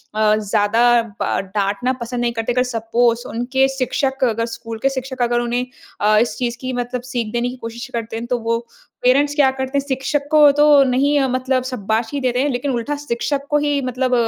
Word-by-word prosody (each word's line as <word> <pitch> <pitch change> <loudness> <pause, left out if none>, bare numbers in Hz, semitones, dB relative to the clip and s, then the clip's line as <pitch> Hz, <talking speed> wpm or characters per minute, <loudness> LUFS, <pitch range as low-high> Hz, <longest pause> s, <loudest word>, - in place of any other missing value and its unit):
अ, 215 0 +3
ज़्यादा 225 +3 +3 0.2
बा - - 0 0.2
डाँटना 205 +5 0
पसंद 240 +1 -3
नहीं 240 -1 0
करते। 230 +1 -2
अगर 250 +1 +2
सपोज़ 235 0 0
उनके 260 +3 +1
शिक्षक 265 +1 -1
अगर 230 -2 +1
स्कूल 230 -1 -7
के 270 - +4
शिक्षक 260 -1 -5
अगर 240 0 +2
उन्हें 240 +1 -1 0.4
अ, 215 +1 +4
इस 225 0 +1
चीज़ 240 -1 -2
की 260 0 -3
मतलब 245 0 -3
सीख 235 -3 -2
देने 240 +1 0
की 250 - -7
कोशिश 235 0 -7
करते 230 -1 -4
हैं, 230 - -5
तो 245 0 0
वो 230 0 0 0.5
पेरेंट्स 285 +3 +3
क्या 285 -3 +5
करते 265 +1 -2
हैं, 280 - -1
शिक्षक 270 +2 -1
को 300 -2 +7
तो 295 0 +6
नहीं 275 +3 +2
मतलब 255 0 0
शाबाशी 230 +1 -2
देते 250 -1 0
हैं 290 - +1
लेकिन 265 +2 -2
उल्टा 245 +4 -2
शिक्षक 285 0 -2
को 295 - +3
ही 290 -1 +1
मतलब 255 0 -1
245 Hz, 200 wpm, -19 LUFS, 230-265 Hz, 0.5 s, को